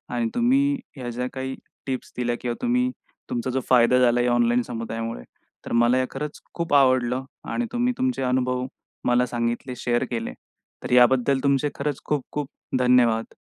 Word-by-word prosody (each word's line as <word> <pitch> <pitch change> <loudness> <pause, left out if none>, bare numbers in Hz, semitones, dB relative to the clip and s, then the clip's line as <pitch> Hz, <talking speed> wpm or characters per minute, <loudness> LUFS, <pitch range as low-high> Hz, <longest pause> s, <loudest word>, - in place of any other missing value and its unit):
आणि 115 -1 0
तुम्ही 275 +4 +3 0.2
ह्या 125 -2 -5
ज्या 125 +1 -3
काही 130 0 -4 0.3
टिप्स 130 -1 -4
दिल्या 120 -1 0
किंवा 120 -1 -2
तुम्ही 250 +1 +2 0.4
तुमचा 120 +1 -2
जो 130 - 0
फायदा 125 0 +5
झालाय 120 0 +3
या 120 - +2
ऑनलाईन 120 0 +3
समुदायामुळे, 115 - -5 0.4
तर - - -7
मला 120 +2 +4
हे 130 - +2
खरंच 150 +2 -5
खूप 170 -3 -3
आवडलं 130 -2 +3 0.3
आणि 240 - -1
तुम्ही 245 +1 +1
तुमचे 255 - 0
अनुभव 125 0 0 0.4
मला 125 0 +3
सांगितले. 120 +1 -2
शेअर 120 +1 0
केले. 115 -1 -3 0.5
तर - - -5
याबद्दल 125 +2 +5
तुमचे 140 +1 +2
खरंच 145 -1 -3
खूप 145 -3 0
खूप 150 -2 -3 0.3
धन्यवाद! 125 -3 +3
125 Hz, 165 wpm, -24 LUFS, 120-140 Hz, 0.5 s, फायदा